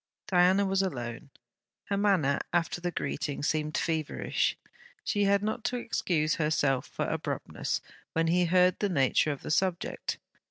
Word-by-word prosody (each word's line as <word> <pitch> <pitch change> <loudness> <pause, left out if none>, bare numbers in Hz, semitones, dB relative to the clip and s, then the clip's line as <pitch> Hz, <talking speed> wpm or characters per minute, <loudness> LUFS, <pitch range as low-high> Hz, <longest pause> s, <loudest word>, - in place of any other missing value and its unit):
Diana 190 +1 +4
was 195 0 +2
alone. 125 -7 -4 0.6
Her 200 - -1
manner, 190 -9 +2
after 175 0 0
the 175 - -1
greeting, 145 -4 -3
seemed 155 +1 0
feverish. 160 -3 0 0.5
She 205 -1 +1
had 200 0 +3
not 220 +2 -2
to 250 - 0
excuse 160 -9 0
herself 145 -4 +1
for - - -3
abruptness - - -3 0.3
when 165 0 +2
he 175 +2 +3
heard 180 +1 +4
the 205 - +1
nature 145 -2 +2
of 140 - -6
the - - -4
subject. 175 +2 -1
175 Hz, 150 wpm, -29 LUFS, 150-195 Hz, 0.6 s, Diana